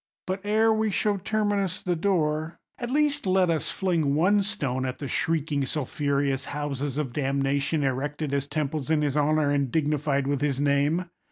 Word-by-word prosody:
But, 190 +1 -3
ere 220 +2 +3
we 220 0 +1
show 205 +1 +1
Terminus 205 -2 -1
the 180 -1 0
door, 160 -3 0 0.2
at 240 - -4
least 290 -3 +1
let 185 -2 +3
us 160 - -1
fling 165 -7 0
one 195 +6 +4
stone 145 - -2
at 130 -1 -3
the 140 - -5
shrieking 150 0 0
sulphureous 140 -1 -1
houses 145 -1 -3
of 140 -5 -2
damnation 140 +2 0
erected 140 +2 -2
as 140 0 0
temples 150 -1 -2
in 155 -2 +2
his 145 -2 0
honour, 150 0 +2
and 140 -3 0
dignified 150 -3 +1
with 140 0 -1
his 140 -2 0
name! 145 +5 +1
150 Hz, 170 wpm, -26 LUFS, 140-185 Hz, 0.2 s, one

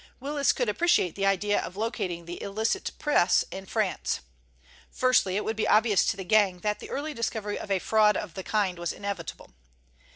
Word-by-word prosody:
Willis 280 +1 +1
could 245 - -1
appreciate 210 - +2
the 195 0 0
idea 205 +1 +2
of 185 - -8
locating 185 -6 -3
the 175 +1 -7
illicit 220 - -1
press 190 - +3
in 190 0 -7
France. 210 -3 -1 0.7
Firstly, 255 -7 +2
it 210 - -1
would 220 - -1
be 215 - 0
obvious 215 -3 +4
to - - 0
the 190 - -5
gang 190 -2 +3
that 210 +1 -1
the - - -9
early 300 +2 -3
discovery 220 -3 -3
of - - -8
a 195 - +2
fraud 210 +2 +3
of 190 -6 -5
the 190 - -5
kind 195 -4 0
was 175 -1 -2
inevitable. 200 -5 -6
210 Hz, 190 wpm, -27 LUFS, 190-225 Hz, 0.7 s, obvious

